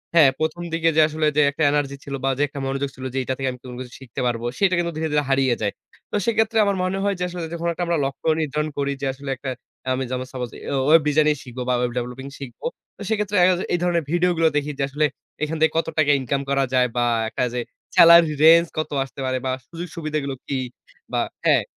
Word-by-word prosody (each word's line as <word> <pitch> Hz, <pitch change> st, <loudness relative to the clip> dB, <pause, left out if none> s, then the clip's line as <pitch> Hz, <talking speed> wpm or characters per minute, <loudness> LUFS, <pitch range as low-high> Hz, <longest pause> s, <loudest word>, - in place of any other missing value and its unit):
হ্যাঁ, 150 Hz, -5 st, +8 dB
১ম, 160 Hz, +2 st, -1 dB
দিকে 165 Hz, 0 st, +2 dB
যে 160 Hz, -, +6 dB
আসলে 155 Hz, 0 st, -1 dB
যে -, -, +6 dB
একটা 155 Hz, +2 st, -2 dB
এনার্জি 145 Hz, -1 st, 0 dB
ছিল 140 Hz, -, -7 dB
বা 135 Hz, -, +2 dB
যে 145 Hz, -, +2 dB
একটা 140 Hz, 0 st, -8 dB
মনোযোগ 135 Hz, +1 st, -2 dB
ছিল, 130 Hz, 0 st, -8 dB
যে -, -, -3 dB
এইটা 130 Hz, -, -2 dB
থেকে 135 Hz, -1 st, -2 dB
আমি 125 Hz, -, -10 dB
কোন 125 Hz, -1 st, -8 dB
কিছু 125 Hz, -2 st, -8 dB
শিখতে 125 Hz, -3 st, -6 dB
পারবো 120 Hz, 0 st, -2 dB
সেটা 190 Hz, -2 st, +3 dB
কিন্তু 170 Hz, 0 st, -1 dB
ধীরে, 160 Hz, 0 st, -1 dB
ধীরে 150 Hz, 0 st, +3 dB
হারিয়ে 135 Hz, -3 st, +3 dB
যায়। 100 Hz, -, 0 dB, 0.4 s
তো -, -, -2 dB
সেক্ষেত্রে 225 Hz, 0 st, +2 dB
আমার 200 Hz, -, +1 dB
মনে 185 Hz, +1 st, -1 dB
হয় 200 Hz, -1 st, +1 dB
যে -, -, -1 dB
আসলে 175 Hz, -2 st, -5 dB
যখন 170 Hz, 0 st, -3 dB
একটা 175 Hz, -, -3 dB
আমরা 170 Hz, -1 st, +1 dB
লক্ষ্য 135 Hz, +3 st, -5 dB
নির্ধারণ 150 Hz, +1 st, -1 dB
করি 140 Hz, 0 st, 0 dB
যে -, -, -1 dB
আসলে 140 Hz, +1 st, -8 dB
একটা 135 Hz, +1 st, -6 dB, 0.4 s
আমি 130 Hz, +1 st, -1 dB
যেমন 130 Hz, 0 st, -2 dB
সাপোজ 125 Hz, -2 st, -4 dB
অ্যা 140 Hz, -, -4 dB
ওয়েব 160 Hz, +1 st, +7 dB
ডিজাইন 150 Hz, +1 st, +3 dB, 0.2 s
শিখবো 125 Hz, -1 st, -7 dB
বা -, -, +3 dB
ওয়েব 125 Hz, -1 st, 0 dB
ডেভেলপিং 125 Hz, +2 st, -4 dB
শিখবো। 135 Hz, -, -9 dB, 0.3 s
তো -, -, -13 dB
সেক্ষেত্রে 210 Hz, -2 st, -1 dB
দেখা 180 Hz, 0 st, +5 dB
যায় -, -, -4 dB
এই 175 Hz, -, +2 dB
ধরনের 170 Hz, -2 st, +1 dB
ভিডিও 175 Hz, +1 st, +3 dB
গুলা 165 Hz, -1 st, +4 dB
দেখি 145 Hz, +1 st, -1 dB
যে -, -, +1 dB
আসলে 150 Hz, +2 st, +1 dB, 0.4 s
এখান 155 Hz, +1 st, -1 dB
থেকে 160 Hz, -, +4 dB
কত 165 Hz, -, +1 dB
টাকা 145 Hz, -2 st, +4 dB
ইনকাম 135 Hz, +2 st, -1 dB
করা 140 Hz, 0 st, +2 dB
যায় 125 Hz, -1 st, +4 dB
বা 120 Hz, -, +3 dB, 0.2 s
একটা 125 Hz, -, -2 dB
যে 125 Hz, -, -1 dB, 0.4 s
salary 170 Hz, -2 st, +8 dB
range 165 Hz, +1 st, +7 dB
কত 155 Hz, -, -1 dB
আসতে 135 Hz, +1 st, -12 dB
পারে 130 Hz, 0 st, 0 dB
বা 130 Hz, -, 0 dB, 0.2 s
সুযোগ-সুবিধা 165 Hz, -2 st, -5 dB
গুলো 135 Hz, -1 st, -3 dB
কি 135 Hz, -, -1 dB, 0.6 s
বা -, -, +2 dB, 0.2 s
হ্যাঁ। -, -, +4 dB
150 Hz, 240 wpm, -23 LUFS, 135-165 Hz, 0.6 s, হ্যাঁ